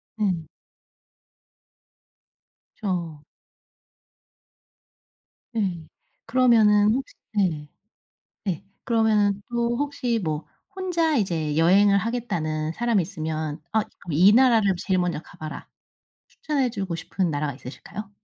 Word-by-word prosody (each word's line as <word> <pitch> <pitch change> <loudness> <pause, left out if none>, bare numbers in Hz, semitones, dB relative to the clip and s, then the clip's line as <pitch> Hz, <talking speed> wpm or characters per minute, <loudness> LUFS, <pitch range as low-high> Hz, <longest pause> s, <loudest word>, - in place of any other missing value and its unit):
네. 185 -7 -1 2.3
그죠. 170 -7 -3 2.3
네. 185 -8 -2 0.4
그러면은 220 -4 +5
혹시 265 +2 -4 0.2
네. 165 -8 0 0.7
네. 190 -3 -2 0.2
그러면은 215 -3 +2
또 235 0 0
혹시 270 -5 -1
뭐 155 -1 -2 0.3
혼자 340 -4 +1
이제 165 - 0
여행을 200 +5 +5
하겠다는 165 -9 -2
사람이 235 0 +1
있으면 155 -1 -4
"어 220 - +4 0.3
이 180 +8 +6
나라를 230 -5 +5
제일 185 +1 0
먼저 180 -3 0
가 175 - -17
봐라." 155 -2 -7 0.6
추천해 290 - -1
주고 195 -6 -3
싶은 170 +2 -2
나라가 145 -1 -1
있으실까요? 190 +11 -9
200 Hz, 210 characters per minute, -24 LUFS, 165-230 Hz, 2.3 s, 이